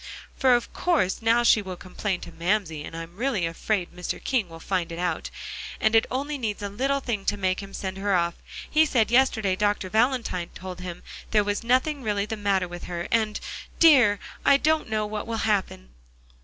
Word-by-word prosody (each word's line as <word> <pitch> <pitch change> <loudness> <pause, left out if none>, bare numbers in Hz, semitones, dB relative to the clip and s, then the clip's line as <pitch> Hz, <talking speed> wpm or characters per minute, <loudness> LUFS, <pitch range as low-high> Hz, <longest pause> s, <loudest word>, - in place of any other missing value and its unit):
"For 255 -2 +4
of 240 - -2
course, 290 - +1
now 230 +2 +3
she 230 -2 +5
will 190 -2 -6
complain 185 +1 -4
to - - -9
Mamsie, 170 -4 -1
and 165 - -8
I'm 165 +2 -8
really 235 -7 0
afraid 175 +3 -1
Mr. 180 -1 -4
King 235 -9 0
will 165 0 -10
find 175 -1 -2
it 165 - -5
out; 175 -2 -2 0.5
and 220 +1 +3
it 225 - +5
only 280 +3 -2
needs 210 -4 -3
a 200 - -2
little 270 +7 0
thing 225 -6 -2
to 205 - +1
make 185 -1 0
him 195 -1 -8
send 190 -1 -5
her 200 -1 +1
off. 170 -1 +1 0.3
He 310 +1 +4
said 230 -6 +2
yesterday 230 -6 +3
Dr. 205 -1 0
Valentine 225 -6 +1
told 185 -1 -7
him 180 -1 -7 0.3
there 210 -1 +3
was 205 +2 -2
nothing 260 +5 +2
really 205 -3 0
the 220 +1 -4
matter 200 -3 +1
with 175 0 -8
her 175 -1 -4
and 220 -2 +1 0.4
dear! 255 -11 +6 0.2
I 280 - +6
don't 310 -3 +1
know 215 -1 0
what 210 0 -4
will 230 -1 -2
happen." 195 - -1
205 Hz, 200 wpm, -25 LUFS, 185-235 Hz, 0.5 s, dear